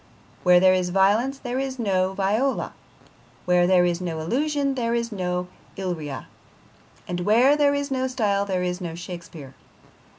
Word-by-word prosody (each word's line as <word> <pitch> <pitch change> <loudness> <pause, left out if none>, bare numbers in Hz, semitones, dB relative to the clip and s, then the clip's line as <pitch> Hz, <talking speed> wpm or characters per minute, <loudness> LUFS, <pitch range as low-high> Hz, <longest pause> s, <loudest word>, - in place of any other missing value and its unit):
Where 180 -1 +6
there 185 0 +5
is 180 -1 0
violence 205 +9 +2
there 255 -1 -4
is 265 -1 -3
no 190 -5 0
Viola, 210 +8 0 0.7
where 180 0 +3
there 180 -1 +4
is 175 0 -1
no 165 -3 -3
illusion 280 - 0
there 235 -3 -1
is 235 0 -2
no 180 -2 -2 0.3
Illyria, 160 -8 -4 0.8
and 175 0 -3
where 235 +10 +4
there 285 -1 +3
is 285 0 -3
no 260 0 0
style 205 -6 0
there 185 -2 -2
is 180 +1 -3
no 170 -2 -5
Shakespeare. 170 -5 -9
190 Hz, 160 wpm, -24 LUFS, 180-255 Hz, 0.8 s, Where